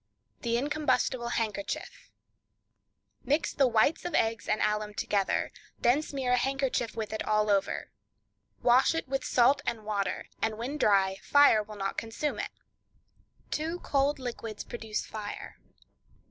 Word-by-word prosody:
The 235 -1 +1
Incombustible 275 -3 0
Handkerchief.—Mix 280 +4 -5
the 275 -2 +4
whites 235 +6 +2
of 350 - -3
eggs 225 -1 0
and 215 - +2
alum 210 0 0
together; 200 -2 0 0.3
then 250 +5 +3
smear 270 -4 -3
a 250 - +4
handkerchief 265 -3 0
with 220 -1 -3
it 220 - -2
all 215 0 +2
over. 200 -1 0 0.7
Wash 255 +6 +5
it 325 - -2
in 270 +1 -1
salt 265 +4 +3
and 225 -2 -3
water, 200 -3 -2 0.2
and 220 -1 0
when 265 +6 -4
dry 195 -4 +3
fire 285 -6 +6
will 210 0 -9
not 195 -1 -2
consume 230 +6 -3
it. - - -2 1.0
Two 325 +3 -2
Cold 280 +1 +1
Liquids 230 -4 -5
Produce 220 -3 -4
Fire. 210 -1 -7
235 Hz, 135 wpm, -29 LUFS, 215-275 Hz, 1.0 s, fire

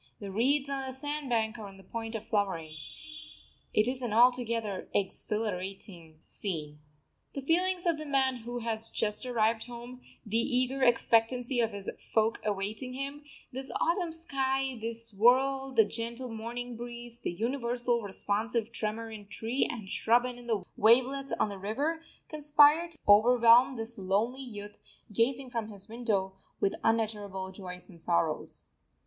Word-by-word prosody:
The 200 -2 -6
reeds 270 +7 +2
on 270 -1 -2
the 260 - -4
sand 290 +1 -3
bank 225 -1 0
are 210 - -6
on 195 -1 -12
the 195 - -15
point 225 +3 -5
of 220 0 -5
flowering. 195 -8 -1 1.0
It 215 +2 +3
is 255 +1 -1
altogether 235 -2 +3
an 185 - -7
exhilarating 190 -5 -4
scene. 150 -7 -4 0.5
The 275 - -5
feelings 360 +4 +2
of 335 -3 +2
the 310 - -6
man 265 -2 +2
who 240 +1 -6
has 225 -1 -2
just 210 +3 -1
arrived 225 -2 +1
home, 245 +1 -9 0.2
the 220 +2 +1
eager 255 +2 +1
expectancy 240 +1 +3
of 230 -1 +2
his 200 -1 -8
folk 220 +1 0
awaiting 210 +5 -2
him, 280 +2 -5 0.3
this 265 +1 -6
autumn 345 -1 +1
sky, 270 -5 -1
this 230 0 -5
world, 265 +5 +3
the 220 -2 +7
gentle 235 +3 -4
morning 235 +2 -5
breeze, 240 0 -8
the - - -3
universal 240 +3 0
responsive 215 +3 -1
tremor 225 0 -3
in 210 -2 -9
tree 230 +6 -1
and 220 -5 -7
shrub 235 +5 +3
and 250 -1 -5
in 240 - -12
the 215 -5 0
wavelets 260 +5 +4
on - - +2
the 200 -1 -7
river, 285 - -1 0.3
conspire 300 +2 +5
to 335 -2 -6
overwhelm 235 +4 +7
this 225 -1 -5
lonely 210 +8 0
youth, 210 -5 -8 0.3
gazing 250 +4 +1
from 230 -3 -2
his 200 -2 -9
window, 215 -5 -1 0.3
with 195 - +2
unutterable 210 -4 0
joys 180 -2 -8
and 170 -5 -14
sorrows. 85 - -1
230 Hz, 155 wpm, -30 LUFS, 210-260 Hz, 1.0 s, the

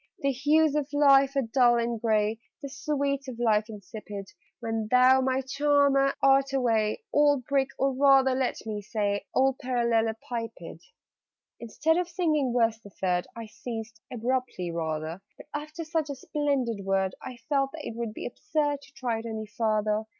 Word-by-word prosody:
_ - - +4
'_The 275 - +2
hues 300 +3 +3
of 295 -2 -1
life 275 -1 +5
are 275 - +2
dull 240 +1 +3
and 235 -1 -2
gray, 220 -1 +1 0.2
The 280 - -5
sweets 280 -1 -2
of 250 -3 -6
life 220 -2 +2
insipid, 205 -1 -8 0.3
When 225 -2 -3
thou, 255 +2 +6
my 260 0 +1
charmer, 280 0 +2
art 275 0 +4
away 230 - +1
Old 290 -3 +3
Brick, 275 -1 +1
or 270 0 +1
rather, 270 -1 +5
let 255 -2 -2
me 210 -1 -4
say, 205 -1 -2
Old 265 0 +2
Parallelepiped!_' 230 - -2 0.8
Instead 310 +8 0
of 355 -1 -1
singing 310 -7 0
Verse 230 -2 +2
the 205 - -14
Third, 180 -2 -1
I 230 -1 -6
ceased 225 0 -7
abruptly, 245 -7 -2
rather: 160 +1 -3 0.2
But, - - -14
after 305 +3 -5
such 315 -2 -1
a 280 - -3
splendid 265 -7 -1
word, 190 -1 0
I 255 -2 -8
felt 275 -2 +1
that 315 -2 -7
it 225 - -6
would 230 -2 -4
be - - -6
absurd 290 - -1
To 280 - -18
try 245 -4 -2
it 230 - -7
any 220 -1 -4
farther. 215 0 0
250 Hz, 170 wpm, -27 LUFS, 220-275 Hz, 0.8 s, thou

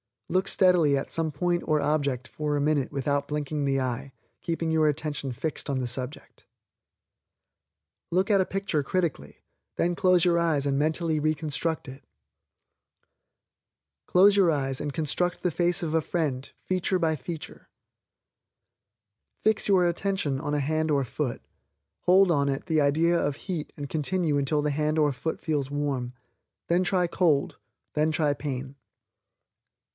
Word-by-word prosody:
Look 185 +2 +1
steadily 175 -7 +4
at 135 - -4
some 165 -1 0
point 175 +4 0
or 155 -1 +2
object 140 -4 0
for 150 -1 -2
a 145 - 0
minute 145 -2 +1
without 140 +1 -1
winking 150 0 -2
the 135 -1 +1
eye, 130 +1 -3 0.3
keeping 165 -1 -2
your 160 -1 +3
attention 145 -2 -2
fixed 155 +4 -4
on 135 -2 0
the 125 +1 -2
object. 130 +4 -10 1.6
Look 185 +4 +1
at 200 -2 +5
a - - +1
picture 195 -6 -1
critically, 145 - -3 0.3
then 175 - +1
close 180 0 +3
your 170 -2 +3
eyes 160 -4 +1
and 140 -1 +1
mentally 160 +1 0
reconstruct 155 +1 -1
it. 135 +2 -12 2.0
Close 200 +3 +5
your 190 -4 +5
eyes 135 -4 0
and 145 -1 -4
construct 175 +4 -1
the 180 - +1
face 175 +3 0
of 160 -2 -2
a 160 - +3
friend, 145 -5 -2
feature 185 0 0
by 160 -3 +1
feature. 160 +4 -8 1.7
Fix 220 0 +2
your 190 -3 +4
attention 170 -5 -1
on 145 0 -3
a 145 - +1
hand 155 +3 0
or 140 -2 +2
foot, 130 0 -3 0.6
hold 185 0 +5
on 140 -3 +2
it 135 0 -3
the 155 -1 +2
idea 165 +4 +3
of 145 -3 -1
heat 170 -1 -5
and 145 -1 -5
continue 160 0 0
until 145 +2 +1
the 150 - +1
hand 150 +2 0
or 150 -2 +3
foot 140 +5 -4
feels 145 -4 -1
warm. 140 -4 -2 0.6
Then 175 +2 +3
try 180 -1 +2
cold; 165 -4 +1 0.4
then 155 +1 +1
try 150 -2 +1
pain. 135 -2 -5
155 Hz, 155 wpm, -27 LUFS, 140-170 Hz, 2.0 s, at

